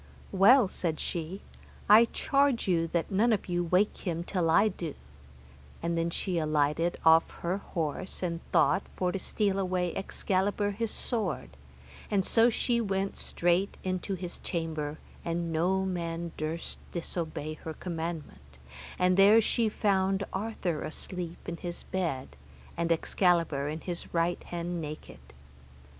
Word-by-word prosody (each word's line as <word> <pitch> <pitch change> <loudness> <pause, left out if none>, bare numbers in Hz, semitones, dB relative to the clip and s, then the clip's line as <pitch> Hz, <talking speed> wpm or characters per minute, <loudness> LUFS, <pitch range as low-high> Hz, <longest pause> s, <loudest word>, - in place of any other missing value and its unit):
Well, 205 +5 +6
said 165 -4 -2
she, 175 +3 -4 0.4
I 215 +3 +8
charge 275 0 +1
you 165 -3 +2
that 170 +2 -1
none 220 +5 +3
of 215 - 0
you 175 -1 0
awake 180 +5 +2
him 170 -3 -2
till 175 -2 0
I 200 +6 +5
do, 170 -6 -5 0.9
and 170 0 0
then 165 0 0
she 175 0 -1
alighted 155 +2 +1
off 160 0 +6 0.2
her 180 +3 +1
horse, 175 +1 -4
and 170 -2 -1
thought - - +4
for 180 -1 0
to 195 - -3
steal 200 0 0
away 180 -2 0
Excalibur 200 +1 0
his 225 +2 -2
sword, 190 - -3 0.6
and 195 -2 +2
so 230 +1 +5
she 235 0 +1
went 195 -2 -1
straight 175 +3 0
unto 185 +1 -1
his 180 -1 -6
chamber, 155 -3 -3 0.3
and 170 0 -2
no 185 +4 +2
man 170 -2 -3
durst 155 +2 -4
disobey 160 -3 -4
her 160 -1 -5
commandment, 160 - -6 0.4
and 180 0 +3
there 205 +3 +8
she 225 0 +1
found 195 -2 +1
Arthur 190 -5 -2
asleep 175 +1 -6
in 170 -1 -4
his 175 0 -6
bed, 160 - -3 0.4
and 170 0 -1
Excalibur 165 -4 +2
in 155 +2 -4
his 175 -2 -5
right 170 +1 +1
hand 175 0 -3
naked. 155 0 -7
175 Hz, 145 wpm, -29 LUFS, 165-195 Hz, 0.9 s, I